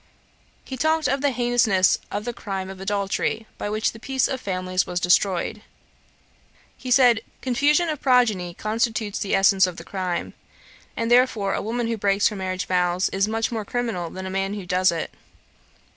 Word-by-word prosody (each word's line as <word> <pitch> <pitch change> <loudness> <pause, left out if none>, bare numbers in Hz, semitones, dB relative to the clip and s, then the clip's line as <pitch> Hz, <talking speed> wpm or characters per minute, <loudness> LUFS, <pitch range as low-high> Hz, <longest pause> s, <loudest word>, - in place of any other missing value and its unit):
He 260 - -7
talked 315 +3 +1
of 275 +1 0
the 285 - +3
heinousness 240 -6 +2
of 205 +1 -4
the 240 - -3
crime 195 -4 -5
of 190 - -11
adultery, 200 +2 -1
by - - -3
which 215 +1 0
the 225 - -13
peace 265 +2 0
of 260 -1 -4
families 185 -2 -1
was 180 0 -2
destroyed. 180 +3 +1 1.1
He 255 - -8
said, 245 -3 +5 0.2
'Confusion 290 +6 +2
of 305 -3 -3
progeny 220 -10 +2
constitutes 220 -1 -1
the 200 - 0
essence 195 -1 +5
of 180 -1 -7
the - - -8
crime; 185 -3 -3 0.6
and 230 +1 -1
therefore 240 -5 +3
a - - -1
woman 235 +2 -2
who 230 0 -2
breaks 200 0 +2
her 210 - -7
marriage 185 -1 -3
vows 180 0 +1
is 195 +1 0
much 225 +1 -1
more 225 -2 -3
criminal 220 -6 -3
than 190 +2 -7
a 190 - -5
man 195 +1 -1
who 200 -3 -6
does 185 +1 +2
it. 165 -1 -4
210 Hz, 180 wpm, -23 LUFS, 190-240 Hz, 1.1 s, said